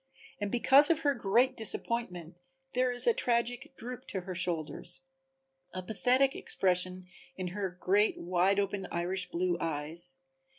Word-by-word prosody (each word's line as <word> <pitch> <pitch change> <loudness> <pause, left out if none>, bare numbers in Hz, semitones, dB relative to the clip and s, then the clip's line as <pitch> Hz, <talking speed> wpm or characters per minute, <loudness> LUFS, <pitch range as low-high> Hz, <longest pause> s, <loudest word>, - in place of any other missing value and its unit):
And 205 -1 -2
because 270 +4 +6
of 325 -1 +2
her 285 -2 +2
great 240 +3 +2
disappointment 185 -7 -3 0.3
there 255 0 +2
is 245 - -1
a 470 - +5
tragic 245 - -1
droop 250 +2 -8
to 190 - -4
her 185 +1 -6
shoulders, 175 - -3 0.7
a 185 - -4
pathetic 250 +7 +2
expression 185 0 0 0.3
in 185 -1 -4
her 190 -1 -4
great 205 +4 +2
wide 185 +3 +1
open 200 -1 -2
Irish 180 +2 -2
blue 175 0 -1
eyes. 165 - -2
195 Hz, 140 wpm, -31 LUFS, 180-245 Hz, 0.7 s, because